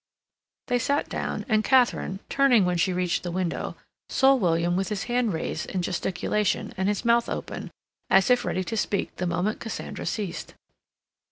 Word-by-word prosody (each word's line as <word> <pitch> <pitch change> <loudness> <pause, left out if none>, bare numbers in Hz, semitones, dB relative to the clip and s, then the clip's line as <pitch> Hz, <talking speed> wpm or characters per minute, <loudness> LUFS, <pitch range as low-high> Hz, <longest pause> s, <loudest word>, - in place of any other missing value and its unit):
They 245 -1 +1
sat 280 +4 0
down, - - -3
and 215 -3 +2
Katharine, 245 -7 +2
turning 255 -8 +4
when 180 -1 +1
she 180 +2 +2
reached 180 -1 0
the 175 - -4
window, 180 0 -2 0.3
saw 270 0 +5
William 175 -7 +1
with 190 0 -1
his 210 -1 -2
hand 240 -2 0
raised 160 - -3
in 185 -2 -2
gesticulation 190 +3 -1
and 190 +1 0
his 210 +3 -2
mouth 235 0 +3
open, - - -5 0.4
as 190 +5 +5
if 245 - +4
ready 185 - -1
to 225 - -4
speak 210 -2 -1
the 180 - -1
moment 180 +5 -1
Cassandra 225 - -5
ceased. 200 -6 -4
195 Hz, 170 wpm, -26 LUFS, 180-235 Hz, 0.4 s, saw